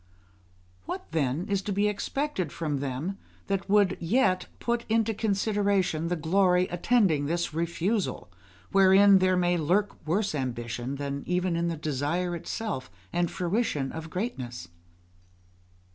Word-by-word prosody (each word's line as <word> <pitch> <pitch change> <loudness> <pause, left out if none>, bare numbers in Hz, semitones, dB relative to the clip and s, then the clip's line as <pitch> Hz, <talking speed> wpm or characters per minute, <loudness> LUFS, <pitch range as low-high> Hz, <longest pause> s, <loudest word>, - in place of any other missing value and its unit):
What, - - -6
then, 155 +1 0
is 200 -1 0
to 205 - -4
be 200 +2 +2
expected 210 - -2
from 150 -4 -2
them 140 +9 -3 0.3
that 195 0 -2
would 200 -2 +4
yet 185 +1 +2
put 235 0 -1
into 225 0 +2
consideration 200 -5 +1
the 175 - 0
glory 180 +2 +3
attending 175 -6 +2
this 170 0 -1
refusal, 170 +6 -1 0.4
wherein 195 0 +6
there 185 0 +3
may 175 0 +2
lurk 190 +7 +1
worse 195 +4 +1
ambition 125 -1 -3
than 140 0 -4
even 180 0 0
in 170 +1 0
the 165 -1 -2
desire 155 +5 -1
itself, 170 - -4 0.2
and 175 -1 +1
fruition 175 - -1
of 160 0 -7
greatness? 130 - -4
180 Hz, 130 wpm, -28 LUFS, 155-200 Hz, 0.4 s, wherein